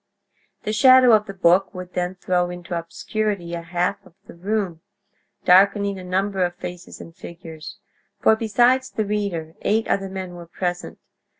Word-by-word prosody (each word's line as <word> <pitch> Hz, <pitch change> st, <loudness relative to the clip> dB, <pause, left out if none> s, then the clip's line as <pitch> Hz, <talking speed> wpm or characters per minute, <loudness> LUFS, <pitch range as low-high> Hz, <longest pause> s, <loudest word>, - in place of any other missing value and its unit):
The 215 Hz, -, -2 dB
shadow 255 Hz, +2 st, +7 dB
of 215 Hz, -1 st, +4 dB
the 195 Hz, -, -6 dB
book 185 Hz, +2 st, +3 dB
would 180 Hz, 0 st, -8 dB
then 180 Hz, +1 st, -2 dB
throw 180 Hz, -1 st, 0 dB
into 175 Hz, 0 st, -6 dB
obscurity 175 Hz, +2 st, -3 dB
a 170 Hz, -, -3 dB
half 175 Hz, +1 st, -2 dB
of 165 Hz, -, -20 dB
the -, -, -12 dB
room, 185 Hz, -2 st, -3 dB, 0.6 s
darkening 200 Hz, +1 st, +4 dB
a -, -, -9 dB
number 190 Hz, +1 st, 0 dB
of 175 Hz, 0 st, -2 dB
faces 180 Hz, 0 st, -8 dB
and 165 Hz, -, -12 dB
figures; 165 Hz, +1 st, -10 dB, 0.4 s
for 220 Hz, -, +4 dB
besides 240 Hz, +4 st, +2 dB
the 215 Hz, -, -2 dB
reader, 200 Hz, -6 st, -3 dB
eight 220 Hz, +2 st, +1 dB
other 195 Hz, -1 st, -1 dB
men 190 Hz, -2 st, -6 dB
were 175 Hz, -1 st, -10 dB
present. 175 Hz, +1 st, -4 dB
185 Hz, 165 wpm, -22 LUFS, 175-210 Hz, 0.6 s, shadow